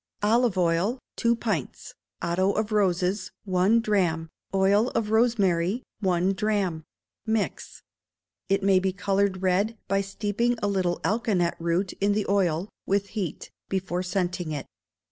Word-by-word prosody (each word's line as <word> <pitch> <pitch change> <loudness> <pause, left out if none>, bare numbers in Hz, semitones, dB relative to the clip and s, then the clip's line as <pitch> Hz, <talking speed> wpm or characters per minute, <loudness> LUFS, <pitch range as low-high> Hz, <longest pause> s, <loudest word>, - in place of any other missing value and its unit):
Olive 225 -1 +3
oil, 180 +7 +2 0.2
two 235 0 +2
pints; 215 - -3 0.3
otto 185 +4 +1
of 215 0 -1
roses, 190 -1 +1 0.2
one 190 +4 +3
drachm; 175 -7 0 0.2
oil 195 +4 +3
of 215 -2 0
rosemary, 220 -2 +2 0.2
one 185 -1 +1
drachm: 195 -6 -1 0.4
mix. 220 -1 -2 0.7
It 195 0 +2
may 195 -1 +5
be 190 0 -1
coloured 195 0 0
red 200 +5 +1
by 195 +1 +2
steeping 210 +4 -1
a 205 - 0
little 185 -3 0
alkanet 205 -6 +1
root 170 +3 0
in 205 +1 +3
the 210 0 0
oil 185 -3 +1 0.2
(with 200 0 +1
heat) 190 -7 -4 0.2
before 185 -2 -1
scenting 180 -2 -2
it. 145 -3 -4
195 Hz, 135 wpm, -26 LUFS, 180-210 Hz, 0.7 s, may